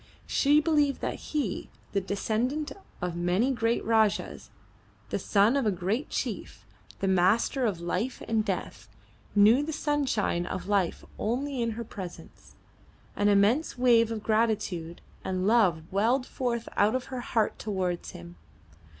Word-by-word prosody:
She 290 +1 +4
believed 295 -3 +2
that - - -3
he, 280 -11 -2 0.2
the 200 - 0
descendant 235 +9 -1 0.3
of 180 -1 -2
many 180 +9 +1
great 230 -2 0
Rajahs, 220 -2 +1 0.6
the - - 0
son 210 +5 +3
of 270 -5 +1
a - - +3
great 195 - -2
chief, - - -4 0.4
the 195 - +1
master 195 +7 +3
of 190 -6 -2
life 180 +9 -3
and 220 -1 +1
death, - - -4 0.5
knew 215 +6 +6
the 305 +2 -3
sunshine 275 - 0
of 185 - -5
life 200 -4 0
only 260 +4 -1
in 230 -1 0
her 235 - -3
presence. 190 -5 -10 0.6
An 205 - +2
immense 205 +10 +3
wave 235 -2 +4
of 220 -1 -4
gratitude 210 -7 0 0.2
and 185 0 -2
love 200 -8 +3
welled 235 +6 +2
forth 235 -3 -3
out 210 +4 +3
of 255 - -2
her 250 - -3
heart 225 -2 0
towards 185 -4 -2
him. 85 +1 -11
220 Hz, 145 wpm, -28 LUFS, 195-250 Hz, 0.6 s, knew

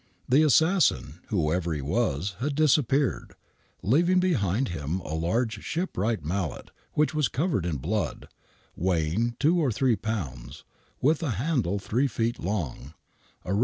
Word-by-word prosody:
The 135 +4 +5
assassin, 155 - +3
whoever 85 -3 0
he 75 - -3
was, 90 - -1
had 140 +2 -1
disappeared, 145 -3 +2 0.5
leaving 170 - +3
behind 130 - +1
him 80 +1 -3
a 80 - -6
large 105 +7 -1
shipwright 115 - -2
mallet, 90 0 -3 0.2
which 150 +1 +2
was 150 -2 +2
covered 140 - -1
in 80 -4 -1
blood, 85 +5 -2 0.5
weigh 85 -4 0
ing 115 +6 0
two 165 +5 +3
or 145 -6 +2
three 125 +1 +2
pounds, 75 - -5 0.4
with 150 +4 +3
a 160 - -1
handle 120 - 0
three 120 +8 0
feet 115 -1 -2
long, 80 - -4 0.5
a 90 - -1
i. - - +1
110 Hz, 145 wpm, -27 LUFS, 85-140 Hz, 0.5 s, The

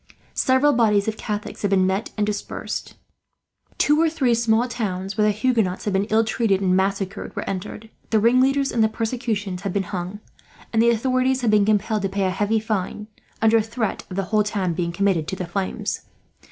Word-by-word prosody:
Several 265 +3 +3
bodies 210 -4 +3
of 220 - -1
Catholics 210 -2 -5
had 205 - +1
been 190 -1 +3
met 190 +4 -1
and 210 - +2
dispersed. 205 -1 -4 0.8
Two 300 +2 +3
or 330 - +4
three 275 -7 +1
small 230 +1 +2
towns, 195 -5 -3
where 210 -1 +3
the - - +4
Huguenots 215 -4 0
had 205 - -1
been 195 +1 +1
ill 220 +1 +4
treated 220 -3 +1
and 185 -2 +2
massacred, 195 +1 -2
were - - -4
entered. 210 +3 -5 0.2
The 220 - +3
ringleaders 260 +5 +3
in 230 - +1
the 220 - +4
persecutions 220 -5 -3
had 195 -2 -3
been 200 - 0
hung, 185 +3 -4 0.5
and 225 - +4
the 235 - +5
authorities 255 +2 +1
had 230 -3 +2
been 210 -1 +4
compelled 215 0 +1
to 195 - -1
pay 195 +1 -1
a 185 - +1
heavy 205 +3 +1
fine, 210 0 -3 0.3
under 225 0 +5
threat 225 0 -3
of 185 - -6
the 195 - 0
whole 215 - +5
town 200 -4 -1
being 170 0 -2
committed 170 -3 +1
to - - -3
the 185 - -4
flames. 195 +4 -3
210 Hz, 200 wpm, -23 LUFS, 195-230 Hz, 0.8 s, the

